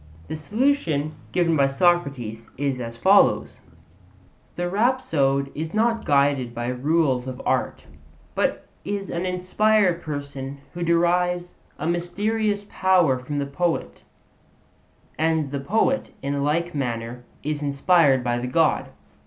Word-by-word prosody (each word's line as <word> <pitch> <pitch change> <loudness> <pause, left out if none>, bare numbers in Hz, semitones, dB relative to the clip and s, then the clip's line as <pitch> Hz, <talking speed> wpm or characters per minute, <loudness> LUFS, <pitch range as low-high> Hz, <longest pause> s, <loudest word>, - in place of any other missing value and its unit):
The - - -3
solution 165 - 0 0.2
given 170 -2 +2
by 140 -2 +4
Socrates 135 -8 0
is 135 -1 -1
as 115 -1 -6
follows: - - +3 1.0
The 175 0 -2
rhapsode 165 - +1
is 160 +5 -5
not 230 +1 +1
guided 140 -4 +2
by 120 +1 -2
rules 130 -1 +1
of 130 -1 -6
art, - - -1 0.5
but - - -1 0.2
is 200 -1 -4
an 175 +2 -2
inspired 185 +1 +2
person 140 -2 -6 0.2
who 175 - -6
derives 175 +1 +1 0.2
a 155 - -5
mysterious 205 +5 -1
power 180 -11 +3
from 145 +3 -5
the 140 - 0
poet; 140 - -2 1.2
and 160 -3 +1
the 140 - -2
poet, 220 - +1
in 140 0 -1
like 170 +4 0
manner, 120 -3 -3 0.2
is 150 0 -2
inspired 140 -1 +3
by 120 0 0
the 125 - -3
God. 155 +5 +2
155 Hz, 130 wpm, -23 LUFS, 135-180 Hz, 1.2 s, by